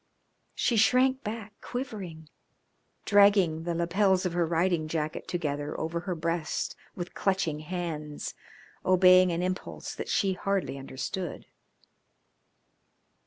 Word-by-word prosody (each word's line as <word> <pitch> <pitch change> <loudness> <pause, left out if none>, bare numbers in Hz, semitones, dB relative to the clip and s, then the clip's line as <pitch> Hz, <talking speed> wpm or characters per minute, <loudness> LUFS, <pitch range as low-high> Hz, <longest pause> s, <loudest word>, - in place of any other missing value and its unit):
She 235 - +1
shrank 260 +4 +4
back, 215 -1 -5
quivering, 195 - -6 0.8
dragging 200 -6 +5
the 170 -1 -1
lapels 185 +3 +2
of 180 - -1
her 175 -1 +1
riding 170 -1 +1
jacket 155 -1 -3
together 145 -4 -2
over 165 +1 -2
her 180 +1 -3
breast 165 -1 -2 0.2
with 175 -1 -6
clutching 190 -6 0
hands, 155 -3 -4 0.5
obeying 185 0 +6
an 170 +1 -1
impulse 185 0 -4
that - - -6
she 195 -2 +2
hardly 190 -6 -1
understood. 135 +6 -5
175 Hz, 115 wpm, -28 LUFS, 160-195 Hz, 0.8 s, obeying